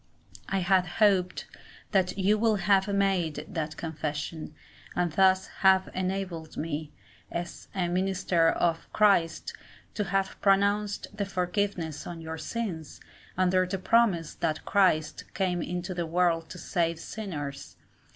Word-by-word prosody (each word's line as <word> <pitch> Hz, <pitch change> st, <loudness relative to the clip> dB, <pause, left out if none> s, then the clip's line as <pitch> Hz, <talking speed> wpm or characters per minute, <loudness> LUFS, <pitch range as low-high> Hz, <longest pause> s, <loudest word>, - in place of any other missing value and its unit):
I 195 Hz, -1 st, 0 dB
had 185 Hz, 0 st, +3 dB
hoped 195 Hz, -4 st, +3 dB, 0.5 s
that 190 Hz, -2 st, +1 dB
you 200 Hz, +2 st, +3 dB
would 215 Hz, -3 st, +2 dB
have 195 Hz, +1 st, +3 dB
made 195 Hz, -6 st, 0 dB
that 160 Hz, -6 st, -4 dB
confession, 155 Hz, 0 st, -4 dB, 0.4 s
and 175 Hz, -2 st, +1 dB
thus 190 Hz, +2 st, +4 dB
have 190 Hz, -1 st, +5 dB
enabled 185 Hz, -4 st, -3 dB
me, 155 Hz, -1 st, -3 dB, 0.4 s
as 175 Hz, 0 st, -5 dB
a 180 Hz, -2 st, 0 dB
minister 180 Hz, -2 st, +2 dB
of 165 Hz, 0 st, 0 dB
Christ, 175 Hz, -7 st, +3 dB, 0.4 s
to 210 Hz, -, -1 dB
have 195 Hz, 0 st, -1 dB
pronounced 200 Hz, +1 st, +2 dB
the 205 Hz, -1 st, -1 dB
forgiveness 180 Hz, -4 st, -2 dB
of 170 Hz, -1 st, -6 dB
your 160 Hz, 0 st, -6 dB
sins, 185 Hz, -10 st, -4 dB, 0.4 s
under 185 Hz, 0 st, +3 dB
the 195 Hz, +1 st, -2 dB
promise 190 Hz, -5 st, +2 dB
that 155 Hz, -2 st, -2 dB
Christ 180 Hz, -6 st, +2 dB
came 180 Hz, -3 st, 0 dB
into 180 Hz, +2 st, -3 dB
the 175 Hz, -2 st, -2 dB
world 165 Hz, -1 st, +1 dB
to 185 Hz, -, -8 dB
save 170 Hz, -1 st, -1 dB
sinners. 150 Hz, -12 st, -6 dB
180 Hz, 130 wpm, -28 LUFS, 165-195 Hz, 0.5 s, have